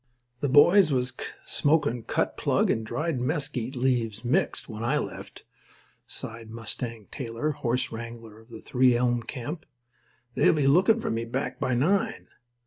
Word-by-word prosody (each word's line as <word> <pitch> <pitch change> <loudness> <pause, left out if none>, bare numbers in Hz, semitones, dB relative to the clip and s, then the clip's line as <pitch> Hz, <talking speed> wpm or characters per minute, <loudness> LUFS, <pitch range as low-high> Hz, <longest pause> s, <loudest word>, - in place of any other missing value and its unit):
"The 145 - 0
boys 165 +5 +6
was 125 -1 0 0.3
smokin' 145 -5 +1
cut - - -1
plug - - +2
and 110 - -1
dried 150 +4 -2
mesquite 135 -3 -2
leaves 120 -4 0
mixed 120 - 0
when 110 -1 -6
I 135 +6 +1
left," - - -6 0.6
sighed 115 0 -8
Mustang 115 -1 -5
Taylor, 120 +2 -3
horse 125 -1 -1
wrangler 115 -1 -8
of 115 +2 -20
the 115 -2 -10
Three 125 -1 +3
Elm 120 -1 +1
camp. 145 +8 -6 0.7
"They'll - - +4
be 150 -3 +1
lookin' 185 +11 +5
for - - -2
me 115 +1 -2
back 125 +2 -3
by 130 - 0
nine. 180 +11 0
125 Hz, 150 wpm, -27 LUFS, 115-145 Hz, 0.7 s, boys